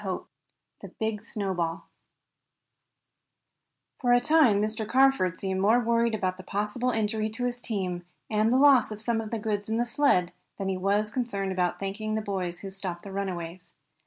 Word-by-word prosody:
CHAPTER - - -1
III - - -12 0.6
THE - - -7
BIG 220 -1 -2
SNOWBALL 190 -6 -3 2.1
For 245 -2 +3
a 245 - +6
time 275 -6 +4
Mr. 215 +1 -2
Carford 260 -9 +3
seemed 190 -1 -2
more 220 +5 +5
worried 235 -1 +2
about 185 -3 -1
the 185 - -10
possible 210 +6 -1
injury 220 -1 0
to 225 +3 -3
his 245 0 -2
team, 185 -6 -3 0.2
and 215 +1 +2
the 255 - +4
loss 270 -5 +6
of 210 - -6
some 225 0 0
of 220 - -7
his 225 -2 -3
goods 205 -1 -2
in 220 - 0
the 240 - +1
sled, 235 -9 +2 0.3
than 195 -1 -2
he 190 - 0
was 200 +3 +1
concerned 205 -7 -2
about 180 -1 0
thanking 215 +2 -3
the 220 - 0
boys 185 -4 -3
who 195 - -6
had - - -11
stopped 185 -3 -5
the 200 - -8
runaways. 180 -3 -5
210 Hz, 190 wpm, -27 LUFS, 190-230 Hz, 2.1 s, a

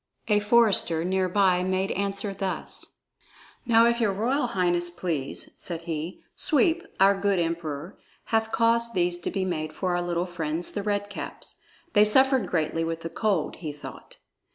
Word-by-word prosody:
A 210 -1 +4
forester 205 -7 +3
near 185 0 +1
by 185 -1 +3
made 185 +1 0
answer 200 +1 -2
thus: 195 -1 -4 0.8
"Now 230 -1 +6
if 235 0 +2
your 215 -3 +3
royal 245 +7 0
highness 175 -5 +1
please," 170 -6 -4
said 170 -2 -3
he, 165 +1 -5
"Sweep, 330 +2 +2 0.2
our 195 +1 +6
good 195 0 +1
Emperor, 165 0 -3 0.3
hath 220 0 +2
caused 230 0 +2
these 175 -1 +1
to - - -3
be 195 -2 -2
made 155 -4 -3
for 180 +1 -1
our 175 - 0
little 175 0 -1
friends, 170 -1 -4
the 205 - -3
Red 205 0 -1
Caps. - - -8 0.4
They 210 - +6
suffered 265 0 +4
greatly 165 -1 0
with 165 0 -3
the 165 - -6
cold, 195 -3 0
he 155 -4 -5
thought." 145 0 -11
185 Hz, 165 wpm, -26 LUFS, 170-210 Hz, 0.8 s, Now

